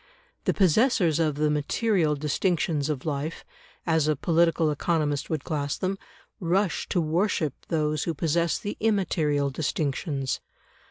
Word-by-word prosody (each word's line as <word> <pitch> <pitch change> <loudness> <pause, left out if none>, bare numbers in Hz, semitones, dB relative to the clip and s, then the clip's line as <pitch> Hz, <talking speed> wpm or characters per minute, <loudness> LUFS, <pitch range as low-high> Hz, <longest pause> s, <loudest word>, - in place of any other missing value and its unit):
The - - +2
possessors 185 - +3
of 155 -3 +1
the 150 +1 +1
"material" 155 +2 +1
distinctions 155 0 0
of 145 -4 -3
life, 150 +1 -3 0.4
as 160 -3 +2
a 155 - +2
political 165 +1 +2
economist 150 -1 0
would 155 -4 -2
class 145 -3 -2
them, 195 +1 -2 0.4
rush 185 +1 0
to 180 - +1
worship 165 - 0
those 155 -2 0
who 165 - -2
possess 170 +2 +1
the 205 -2 -5
immaterial 160 -10 +1
distinctions. 140 -1 -2
160 Hz, 130 wpm, -26 LUFS, 150-175 Hz, 0.4 s, possessors